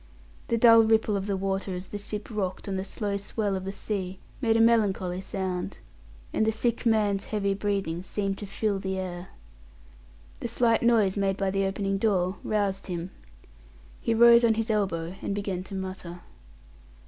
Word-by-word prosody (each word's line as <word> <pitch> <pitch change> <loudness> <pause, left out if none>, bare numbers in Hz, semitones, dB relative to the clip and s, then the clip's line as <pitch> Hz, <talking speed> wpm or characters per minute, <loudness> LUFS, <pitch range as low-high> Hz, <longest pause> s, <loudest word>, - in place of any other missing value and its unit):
The 230 - +1
dull 230 0 +8
ripple 220 -1 +3
of 195 0 -2
the 200 -1 0
water 195 0 -2
as 180 +1 -6
the 205 - -5
ship 210 +1 -5
rocked 195 -3 -3
on 195 - -2
the 190 - -2
slow 200 0 -2
swell 200 0 -2
of 190 0 -4
the 195 - -3
sea 190 -2 -4 0.2
made 225 -3 +3
a - - +2
melancholy 200 -6 +2
sound, 190 -2 -3 0.6
and - - +2
the 220 - +3
sick 235 +2 -1
man's 210 -3 +2
heavy 200 -2 0
breathing 195 -4 -2
seemed 195 +1 -3
to 205 - -6
fill 200 0 -1
the 190 0 -3
air. 180 -1 -5 1.1
The - - -3
slight 230 -1 +2
noise 220 -5 +3
made 195 -1 +1
by 195 -1 0
the 195 0 +1
opening 195 0 -1
door 190 -3 +1
roused 200 -2 -1
him; 175 0 -4 0.9
he 230 - +1
rose 235 +1 +7
on 225 -1 +4
his 225 +1 -1
elbow 185 -5 -1
and 200 - -2
began 195 -3 -3
to 195 - -7
mutter. 185 -2 -6
200 Hz, 180 wpm, -27 LUFS, 190-220 Hz, 1.1 s, dull